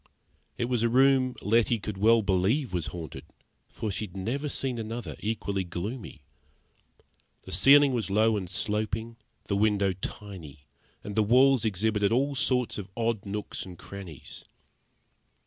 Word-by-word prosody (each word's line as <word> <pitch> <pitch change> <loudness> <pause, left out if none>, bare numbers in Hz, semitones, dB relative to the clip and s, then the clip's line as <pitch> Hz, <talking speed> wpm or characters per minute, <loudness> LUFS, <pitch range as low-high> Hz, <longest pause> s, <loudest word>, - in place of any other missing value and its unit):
It 120 - 0
was 120 -2 0
a 115 - +2
room 130 0 +4
Letty 115 +2 +3
could 105 -1 -5
well 115 +2 +5
believe 100 +7 +1
was 85 -4 -1
haunted, 85 -4 -7 0.5
for 110 - -4
she 105 - -2
had 95 -1 -12
never 130 +10 -2
seen 130 -3 -1
another 115 +1 -5
equally 100 -3 -2
gloomy. 90 - -6 1.2
The - - -10
ceiling 140 - +6
was 115 -5 -2
low 110 +2 +3
and 95 -4 -4
sloping, 110 +4 -2 0.3
the 100 - -2
window 100 -2 +2
tiny, 90 -7 -8 0.4
and 105 - -6
the 110 - +4
walls 125 +3 +4
exhibited 105 0 +1
all 135 +4 +2
sorts 130 -4 0
of 100 -1 -7
odd 115 -3 -1
nooks 105 +1 -4
and 90 -2 -10
crannies. 95 -7 -10
110 Hz, 145 wpm, -28 LUFS, 100-120 Hz, 1.2 s, ceiling